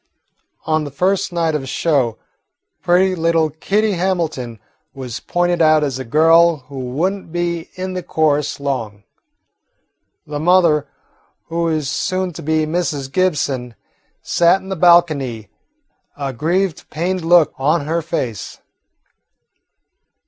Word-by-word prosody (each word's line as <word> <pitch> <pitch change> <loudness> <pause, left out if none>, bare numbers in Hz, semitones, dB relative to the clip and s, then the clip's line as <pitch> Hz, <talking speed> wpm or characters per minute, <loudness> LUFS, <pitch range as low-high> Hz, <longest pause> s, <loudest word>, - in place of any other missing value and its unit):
On 155 -1 +1
the 145 - -5
first 185 +8 0
night 165 -2 0
of 150 - -1
the 135 - -8
show 135 -4 0 0.6
pretty 185 +2 +3
little 165 -2 +1
Kitty 205 +8 0
Hamilton 165 - -2 0.4
was 130 -4 -6
pointed 175 -1 0
out 155 -1 +5
as 135 -3 -2
a - - -4
girl 165 +5 +4
who 135 0 -8
would 140 +10 -1
n't 195 -5 -11
be 170 -1 -2
in 185 0 -4
the 185 - -3
chorus 150 -4 0
long. 115 -8 -4 1.2
The 145 0 -5
mother, 170 -3 +3 0.6
who 170 +1 -1
was 155 -3 -1
soon 185 +5 -2
to - - -8
be 155 +1 +1
Mrs. 155 -5 -2
Gibson, 140 -9 -1 0.5
sat 175 +2 +3
in 190 - -12
the 190 - -2
balcony, 155 - +3 0.7
a 140 -2 -3
grieved, 170 +6 -1
pained 180 +3 -2
look 170 -2 +4
on 145 +2 +1
her 165 +2 -1
face. 135 - -4
160 Hz, 135 wpm, -18 LUFS, 140-175 Hz, 1.2 s, out